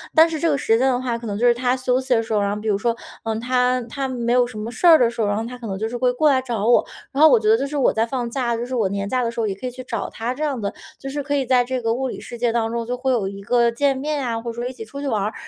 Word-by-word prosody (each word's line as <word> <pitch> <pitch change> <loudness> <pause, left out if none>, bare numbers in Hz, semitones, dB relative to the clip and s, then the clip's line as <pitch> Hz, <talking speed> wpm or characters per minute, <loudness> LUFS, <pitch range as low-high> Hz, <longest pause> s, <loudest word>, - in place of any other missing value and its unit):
但 320 +1 +7
是 320 -1 -3
这 335 - +1
个 290 - +2
时 225 -4 +2
间 260 +3 +2
的 250 -2 +2
话， 250 -2 -2
可 235 0 -8
能 200 -1 -3
就 235 - +1
是 240 - +6
他 250 +1 0
休 255 0 +1
息 260 -1 0
的 225 - +1
时 225 0 -4
候 210 - +2
然 200 0 0
后 210 - -4
比 220 - -6
如 205 -2 +2
说 230 +3 0 0.3
呃， 225 -1 -2
他 250 +1 +1
他 270 +4 -4
没 240 -2 -1
有 250 -1 +4
什 230 - -10
么 215 +2 -5
事 350 - +1
儿 330 -2 +9
的 245 -5 +3
时 235 - -4
候， 210 - +1
然 205 0 0
后 225 - -2
他 250 +2 -7
可 240 -2 -8
能 195 -2 -3
就 220 +3 -2
是 235 - -6
会 250 +1 +2
过 300 +5 +3
来 265 -2 +3
找 235 -5 -3
我， 240 - +5 0.3
然 275 - -1
后 315 - +9
我 245 -5 +5
觉 215 - -2
得 220 - +6
就 275 +3 -2
是 295 +1 -4
我 270 - +3
在 220 - +1
放 245 0 -3
假， 240 -2 -1
就 235 +1 -3
是 255 - -7
我 220 -6 +1
年 200 0 -3
假 250 +4 0
的 235 - 0
时 235 - -6
候 225 - +1
也 200 - -1
可 195 +7 -6
以 - - -4
去 255 +1 -9
找 255 - -4
他 235 +2 -3
这 295 +4 -5
样 285 -5 -1
的。 200 -2 -3 0.3
就 270 - -6
是 290 +2 -3
可 285 +1 -1
以 275 -2 0
在 250 0 +3
这 255 +1 -3
个 225 -1 0
物 260 +2 -2
理 - - -6
世 240 - -9
界 240 0 +1
当 225 -1 0
中， 235 0 -2
就 245 +2 -2
会 260 +1 0
有 225 -6 +1
一 200 0 -7
个 235 +2 +3
见 275 +3 +1
面 290 +1 -2
啊， 230 -2 -2
或 235 0 -4
者 - - -11
说 240 - -2
一 255 - -6
起 240 -3 -8
出 280 +6 -9
去 285 - -3
玩 215 -6 0
儿。 210 +2 -2
245 Hz, 405 characters per minute, -21 LUFS, 225-260 Hz, 0.3 s, 儿